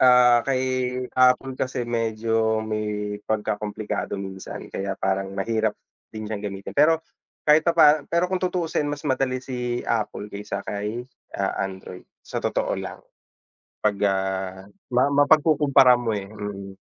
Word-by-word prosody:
ah, 125 -1 +7
kay 130 -1 0
Apple 130 +1 +3
kasi 130 -1 -1
medyo 115 -1 0
may 105 -1 -3
pagkakomplikado 105 -1 -2
minsan 95 -1 -7
kaya 95 0 -3
parang 95 0 -1
mahirap 110 +1 0 0.3
din 110 -1 -6
siyang 105 -1 -4
gamitin. 100 -1 -6
Pero 160 +2 +4 0.4
kahit 150 +1 +6
papaano 155 -3 +4
pero 170 +1 +2
kung 185 0 -2
tutuusin 170 -5 -1
mas 145 0 -5
madali 130 -2 +1
si 125 -2 -3
Apple 105 -2 -2
kaysa 105 +1 -5
kay, 105 +4 -4 0.3
ah, 95 -1 0
Android 95 -1 -8 0.2
sa - - -4
totoo - - 0
lang - - -6 0.8
'pag, 105 -1 +2
ah, 95 -1 -2 0.3
ma 125 +2 +4
mapagkukumpara 145 -2 +5
mo 120 -2 -2
eh, 100 -2 -3
mm. 100 -2 -7
115 Hz, 135 wpm, -24 LUFS, 105-130 Hz, 0.8 s, ah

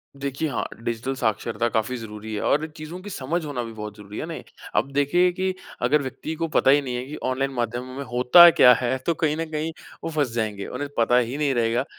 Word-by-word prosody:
देखिए 140 +2 -3
हाँ, 120 - -2 0.2
डिजिटल 120 +3 -2
साक्षरता 115 0 -1
काफ़ी 115 +3 -1
ज़रूरी 110 -1 -8
है 105 - -2
और 150 +2 +2
चीज़ों 155 +4 -7
की 205 - -8
समझ 165 +1 -2
होना 130 -5 -3
भी 115 - -7
बहुत 105 -1 -7
ज़रूरी 105 0 -10
है - - -3
ना? - - -6 0.4
अब 140 - +1
देखिए 175 +6 +3
कि 185 +1 -1 0.3
अगर 140 +5 +3
व्यक्ति 145 +4 -5
को 165 +1 -2
पता 135 -3 +3
ही 145 +1 +5
नहीं 125 -3 -4
है 125 +1 -3
कि 150 +3 -7
ऑनलाइन 135 +1 0
माध्यमों 120 +2 -3
में 140 - -4
होता 130 +8 +8
क्या 125 -6 +7
है, 125 +2 0
तो 165 +6 -1
कहीं 155 -1 0
न 165 - -2
कहीं 155 +1 -2 0.3
वो 165 - -2
फँस 145 -6 0
जाएँगे। 105 -4 -2
उन्हें 140 +3 -5
पता 120 +2 +4
ही 125 +3 0
नहीं 145 -3 +1
रहेगा 120 +1 +1
130 Hz, 230 wpm, -24 LUFS, 120-150 Hz, 0.4 s, होता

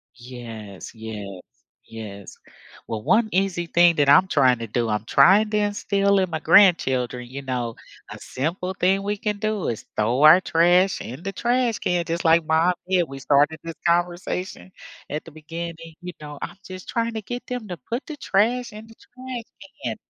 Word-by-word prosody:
Yes, 115 -6 -10
yes, 110 -3 -7 0.6
yes. 100 -3 -9 0.5
Well, 110 -2 -4
one 220 - +2
easy 185 -2 0
thing 170 0 +4
that 145 -1 +2
I'm 185 +6 +6
trying 130 -7 +3
to 115 - -5
do, 115 +2 -1
I'm 105 0 -2
trying 195 - +5
to 210 - 0
instill 200 -1 +1
in 185 -2 0
my 160 - -3
grandchildren, 130 - +3
you 135 +2 -7
know, 125 -3 -3 0.4
a - - -9
simple 180 +7 -4
thing 190 +2 +2
we 205 +1 -2
can 210 0 -2
do 215 -2 -1
is 115 - -5
throw 115 +6 +1
our 155 +4 +9
trash 180 +2 +3
in 130 +9 -8
the 195 - -3
trash 240 +2 0
can 175 -1 0
just 170 0 -3
like 165 0 +4
mom 165 +3 +3
did. 185 -2 +2
We 135 - -8
started 145 +3 +2
this 165 -1 -6
conversation 175 +2 -1 0.4
at 150 +1 -4
the 165 - -12
beginning, 165 +1 -8
you 180 0 -7
know, 150 -1 -8
I'm - - -7
just 185 0 -10
trying 230 0 -1
to 220 - -3
get 245 +4 -6
them 250 -3 -5
to 180 - -5
put 235 +4 -3
the 305 - -7
trash 240 +2 0
in 215 +1 -10
the 225 - -16
trash 255 -1 -9 0.4
can. - - -2
170 Hz, 185 wpm, -23 LUFS, 135-200 Hz, 0.6 s, our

